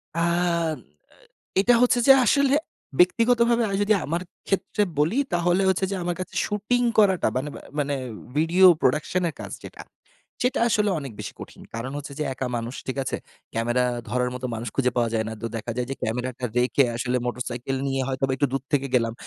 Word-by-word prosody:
আন 170 - 0
আ - - +3 1.4
এটা 240 +4 +5
হচ্ছে 245 0 +4
যে - - +12
আসলে। 280 +3 +3 0.4
ব্যক্তিগতভাবে 235 +5 +4
আমি 195 - -1
যদি 210 +1 +3
আমার 170 +4 -2 0.2
ক্ষেত্রে 205 +2 0 0.2
বলি 165 - +2
তাহলে 175 +2 +2
হচ্ছে 190 0 +2
যে 195 - -2
আমার 175 0 -1
কাছে 185 - -6
শুটিং 215 +4 0 0.2
করাটা 190 -4 +4
মানে 140 +3 -2 0.3
মানে 145 -1 0 0.4
ভিডিও 170 +5 +5
প্রোডাকশন 155 +6 +1
এর - - -6
কাজ - - -7
যেটা। - - -9 0.6
সেটা 250 -1 +1
আসলে 210 -2 +2
অনেক 135 -5 -7
বেশি - - -6
কঠিন। - - -10
কারণ 125 +4 -4
হচ্ছে 145 0 -8
যে 150 - -1
একা 130 - -3
মানুষ 120 +3 -4
ঠিক 130 - -3
আছে? - - -2 0.4
ক্যামেরা 120 +2 +1 0.2
ধরার 125 +2 0
মতো 130 0 -4
মানুষ 115 +1 -4
খুঁজে 125 -2 +2
পাওয়া 120 -2 +2
যায় 110 -1 +1
না। 110 - -5
তো - - -1
দেখা 115 +2 -5
যায় 125 - -1
যে - - -1
ক্যামেরাটা 125 +3 -3
রেখে 130 +2 +3
আসলে 125 +1 -1
মোটরসাইকেল 125 +2 -3
নিয়ে 135 -1 0
হয়তোবা 135 0 -1
একটু 140 +2 +2
দূর 135 -1 -1
থেকে 140 -1 +2
গেলাম। 115 -2 +2
140 Hz, 185 wpm, -24 LUFS, 125-195 Hz, 1.4 s, যে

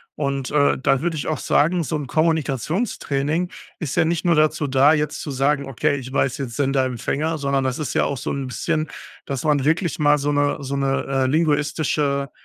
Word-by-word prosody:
Und, 140 -2 -2
äh, 145 -1 +3
da 135 0 +1
würde 170 -1 -1
ich - - -3
auch 155 - -2
sagen, 170 +3 +2
so 160 - -3
'n 145 -2 -3
Kommunikationstraining 155 - 0 0.3
ist 155 -6 -3
ja - - +3
nicht 165 +1 -1
nur 170 -1 +4
dazu 155 -1 +2
da, 135 +3 +5
jetzt 150 -1 -1
zu 145 - -5
sagen: 140 +2 +1
„Okay, 145 +3 0
ich 130 -1 -7
weiß 135 -1 +1
jetzt 125 -5 -5
Sender- 135 -1 +1
Empfänger.“, 145 +6 -2
sondern 140 -1 0
das 130 +2 -2
ist 150 - -3
ja - - +3
auch 140 - -2
so - - -4
'n 140 -1 -3
bisschen, 155 +4 -2 0.4
dass 135 -3 -4
man 145 -3 +2
wirklich 165 +2 +1
mal 150 -2 +3
so 145 +1 0
'ne 145 0 +1
so 140 0 -4
'ne, 135 0 0
äh, 135 -1 +1
linguistische 145 -1 +1
145 Hz, 205 wpm, -22 LUFS, 135-155 Hz, 0.4 s, da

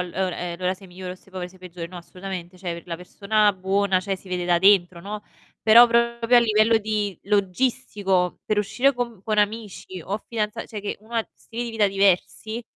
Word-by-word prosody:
allo 180 -1 -4
ehm, 180 -2 -2
allora, 185 0 0
sei 190 +1 -15
migliore 180 0 -7
o - - -9
sei 195 - -23
povero, 180 -1 -5
sei 185 - -19
peggiore. 180 -2 -7
No, 180 - -10
assolutamente. 180 0 -7
Cioè 170 -2 -5
la 170 -1 -4
persona 205 +4 +1
buona, 190 0 +1
cioè 195 +1 -2
si 190 - -16
vede 180 -1 -2
da 175 -1 +3
dentro, 185 -2 +4
no. 205 +3 -6 0.4
Però 230 +2 +9
proprio 235 0 +3
a - - +8
livello 220 0 +4
di 210 -3 -2
logistico, 200 -2 0
per 215 - 0
uscire 250 +7 +2
con 235 -5 -4
con 215 0 -1
amici 205 -3 -2
o 200 +2 -2
fidanza 215 -3 -2
cioè 215 - -6
che 205 - -4
uno 220 +2 -12
ha 225 -1 0
stili 235 +1 -6
di 235 - -4
vita 220 -2 +2
diversi 200 +4 +1
200 Hz, 200 wpm, -24 LUFS, 185-220 Hz, 0.4 s, Però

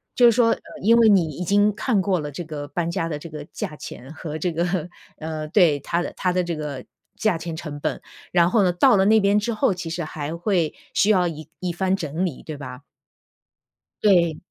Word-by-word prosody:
就 245 - +5
是 - - +7
说， 230 0 +4
呃， - - +1 0.2
因 230 +3 +5
为 230 - +6
你 195 -5 +5
已 180 - -3
经 205 +3 +3
看 210 0 +1
过 185 -2 +1
了 150 -1 -4
这 175 - -5
个 150 -3 -6
搬 165 +4 -2
家 165 -1 -1
的 150 - -3
这 165 +3 -9
个 150 -1 -8
价 155 - -5
钱 130 +1 -9
和 155 -1 -6
这 175 +3 -1
个， 175 +1 -1 0.3
呃， 155 -1 -5
对， 165 -4 +4
它 170 +5 -1
的 - - -6
它 180 - 0
的 180 0 +1
这 170 -1 -3
个 145 -4 -5 0.3
价 215 -5 +1
钱 165 0 -5
成 150 -3 -7
本， - - -2 0.3
然 175 0 +4
后 225 - +4
呢， 180 - +3
到 175 +3 +4
了 190 -1 +3
那 220 +2 +5
边 200 0 +3
之 230 +2 -2
后， 220 -2 +2
其 175 -2 -6
实 170 +1 -3
还 155 +1 -5
会 175 -4 0 0.2
需 205 - +3
要 185 -4 +4
一 155 -2 -7
一 180 -2 -2
番 190 +2 +1
整 170 0 -2
理， 155 - -8
对 155 - -6
吧？ 125 -2 -8 1.2
对。 170 -6 +4
175 Hz, 245 characters per minute, -23 LUFS, 155-195 Hz, 1.2 s, 是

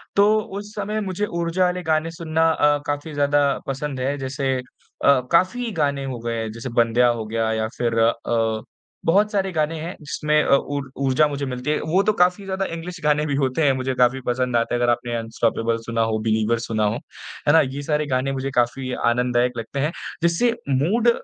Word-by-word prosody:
तो 210 +2 +5
उस 205 0 -7
समय 210 +1 -2
मुझे 195 0 -2
ऊर्जा 170 -1 -1
वाले 180 0 -1
गाने 160 0 0
सुनना 165 -1 +1
अ, 145 -2 +3
काफ़ी 145 +2 -3
ज़्यादा 145 0 +2 0.2
पसंद 135 0 -3
है। 135 +3 -1
जैसे 135 0 -2
अ, 130 +2 0
काफ़ी 225 +8 +2
गाने 140 -5 -1
हो 130 -3 -4
गए 115 0 -3
हैं 110 -1 -4
जैसे 115 +4 -6
बंदेया 120 +1 +3
हो 120 -2 0
गया 110 +1 -1
या 110 0 -1
फिर 115 -1 0
अ, 115 -1 +1 0.4
बहुत 205 +6 +3
सारे 195 -2 0
गाने 160 -1 -1
हैं 170 +4 -5
जिसमें 150 +1 +1
अ, - - +4
ऊर 140 -1 -3
ऊर्जा 140 +2 +3
मुझे 140 -1 -3
मिलती 125 +1 -4
है। - - +1
वो 195 - +4
तो 215 +1 +2
काफ़ी 180 +3 0
ज़्यादा 190 0 -2
इंग्लिश 170 +1 -6
गाने 150 0 +2
भी 145 -2 -1
होते 135 +2 0
हैं 135 - +4
मुझे 130 0 -2
काफ़ी 125 +1 +2
पसंद 125 0 0
आते 115 +1 0
हैं 120 - -1
अगर 120 - +4
आपने 120 0 -2
अनस्टॉपेबल 115 0 -1
सुना 115 -1 -1
हो, 110 -1 0
बिलीवर 110 +1 +1
सुना 110 -2 -1
हो। 105 - +1 0.5
है 145 - +6
ना? 160 - +7
यह 140 +1 -3
सारे 150 +1 0
गाने 135 +2 0
मुझे 135 0 -3
काफ़ी 130 +2 -1
आनंददायक 125 +1 +1
लगते 115 +4 -5
हैं 150 +4 +1 0.3
जिससे 170 +8 +3 0.2
मूड 185 - +2
140 Hz, 205 wpm, -22 LUFS, 120-165 Hz, 0.5 s, ना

